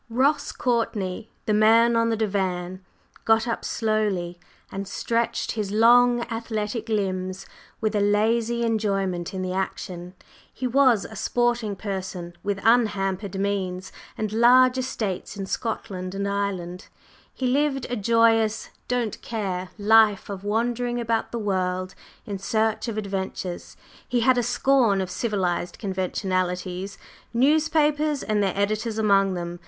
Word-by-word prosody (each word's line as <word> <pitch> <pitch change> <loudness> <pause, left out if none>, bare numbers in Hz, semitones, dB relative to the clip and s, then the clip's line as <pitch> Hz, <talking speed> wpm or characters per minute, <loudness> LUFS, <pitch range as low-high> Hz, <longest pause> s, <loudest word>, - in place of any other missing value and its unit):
Ross 280 +5 +1
Courtney, 220 -4 -2 0.2
the 215 - +1
man 225 +2 +5
on 230 0 +2
the 225 - 0
divan, 185 -3 -2 0.4
got 225 +1 +3
up 230 - -2
slowly 205 -6 -1 0.3
and 195 0 -5
stretched 235 +3 -1
his 210 -3 -3
long 240 +2 +5
athletic 225 -1 -4
limbs 190 -3 -2 0.3
with 215 -1 -1
a - - +3
lazy 225 +3 +2
enjoyment 195 -6 -1
in 185 -1 -4
the 185 0 -3
action. 185 -1 -4 0.4
He 255 - -5
was 250 -4 +4
a 220 - -9
sporting 235 0 0
person 190 -3 -5
with 200 -1 -2
unhampered 200 -4 +1
means 190 -2 -2 0.3
and 215 -1 -3
large 250 +3 +5
estates 215 -7 -3
in 195 - -4
Scotland 190 -3 -4
and 200 0 -2
Ireland; 190 -3 -3 0.4
he 260 - -4
lived 270 0 +1
a 245 - -2
joyous, 225 0 +2 0.2
"don't 245 -3 -2
care" 190 -5 -3
life 210 -1 +4
of 195 -1 -6
wandering 240 +3 -1
about 230 -1 -1
the 235 - -3
world 185 -3 -1 0.3
in 200 -2 -5
search 220 +2 0
of 225 -2 -4
adventures, 190 -3 -4
and - - -24
he 245 -1 +1
had 250 +1 +4
a - - +2
scorn 240 -3 +2
of 185 -1 -3
civilized 185 -4 -1
conventionalities 185 -1 -2 0.4
newspapers 300 +2 +2
and 210 -1 0
their 195 -1 0
editors 215 +2 -1
among 195 -3 +3
them. 175 0 -5
210 Hz, 135 wpm, -24 LUFS, 190-235 Hz, 0.4 s, man